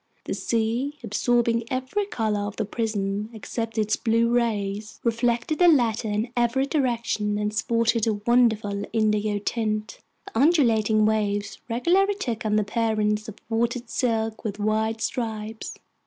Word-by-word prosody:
The - - -2
sea, 235 +6 -1
absorbing 235 +1 +1
every 260 +11 -2
color 220 - -1
of 205 - -6
the 220 - -2
prism 210 -1 -2
except 225 +1 -5
its 215 0 +2
blue 230 0 +2
rays, 215 -3 -1
reflected 235 +5 0
the 355 - +6
latter 240 -8 +3
in 215 +3 -1
every 240 +2 +2
direction 235 -7 0
and 210 0 -1
sported 230 +1 +1
a 220 - +3
wonderful 215 -2 +2
indigo 210 -1 +1
tint. 215 0 -2 0.3
The 225 - -4
undulating 230 -8 +4
waves 205 -2 0
regularly 365 - +2
took 235 - -3
on 210 - +1
the 215 - +3
appearance 215 0 0
of 210 - -9
watered 235 +1 -1
silk 225 -3 -1
with 205 -2 -3
wide 220 +1 0
stripes. 220 -2 -4
225 Hz, 140 wpm, -25 LUFS, 215-240 Hz, 0.3 s, the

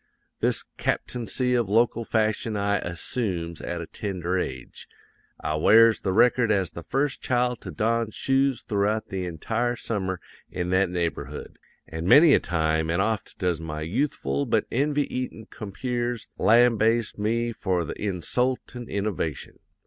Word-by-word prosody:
This - - +1
captaincy 125 +2 -1
of 120 -5 +1
local 115 +2 +2
fashion 110 -1 0
I 100 0 +1
assoomes 85 -1 -3
at 85 0 -4
a - - -5
tender 95 -1 -3
age. 65 -9 -4 0.5
I - - -2
wears 115 +7 +6
the 95 - -1
record 120 +3 +4
as 95 -4 +1
the 85 - -8
first 135 - -1
child 125 -1 0
to - - -7
don 115 +1 0
shoes 135 +1 +1
throughout 105 +1 0
the 95 -1 -3
entire 115 +9 -1
summer 95 -6 -3 0.3
in 90 0 -3
that 95 0 +3
neighborhood; 85 -5 -4 0.3
an' 80 +1 -5
many 150 - +8
a - - +6
time 80 -1 0
an' 85 +2 +1
oft 110 +1 -1
does 90 -3 -1
my 75 -1 -5
yoothful 80 - -1
but - - +2
envy 145 +3 +1
eaten 125 -3 -4
compeers 120 +3 -3
lambaste 115 -1 +3
me 115 +3 0
for 95 -6 -1
the - - -4
insultin' 120 +5 -2
innovation. 100 -7 -3
105 Hz, 145 wpm, -25 LUFS, 90-120 Hz, 0.5 s, many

